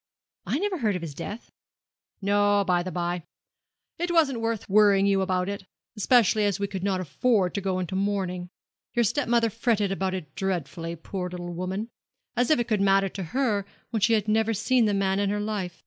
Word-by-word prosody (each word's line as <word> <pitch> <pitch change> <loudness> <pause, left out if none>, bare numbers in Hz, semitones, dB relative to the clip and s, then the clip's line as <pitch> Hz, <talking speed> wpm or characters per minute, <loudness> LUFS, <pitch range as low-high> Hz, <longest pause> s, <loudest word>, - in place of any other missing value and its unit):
'I - - +1
never 385 0 -1
heard 215 -6 +1
of 180 - -4
his 155 -4 -5
death.' 205 +9 -7 0.7
'No, 205 0 +3
by 180 -1 +2
the 185 +1 -5
bye. 175 +1 -2 0.8
It 350 +1 -1
wasn't 290 -8 +3
worth 225 -2 -2
while 195 - -3
worrying 200 -2 +6
you 195 -1 +3
about 185 -1 0
it, 200 -1 -5 0.3
especially 215 0 +4
as 205 -1 +1
we 200 - 0
could 195 -2 -5
not 195 -2 +1
afford 185 - +1
to 200 - -2
go 190 -1 -1
into 185 0 -3
mourning. 190 -3 -1 0.5
Your 240 - +4
step 270 +6 0
mother 230 -1 +3
fretted 220 -3 +1
about 190 -1 -1
that 155 -6 -6
dreadfully, 170 -3 -3
poor 180 +2 -5
little 175 -1 -6
woman; 190 +6 -4 0.4
as 245 0 +1
if 310 - +5
it 240 - -1
could 215 -4 +1
matter 195 0 +3
to 190 -1 -5
her, 215 0 0 0.3
when 225 -3 -1
she 225 +3 +4
had 215 -1 +1
never 220 +1 +2
seen 235 +4 +2
the 205 -1 +1
man 195 0 +1
in 200 -1 +1
her 205 +1 -1
life. 205 -4 -3
200 Hz, 210 wpm, -26 LUFS, 185-220 Hz, 0.8 s, worrying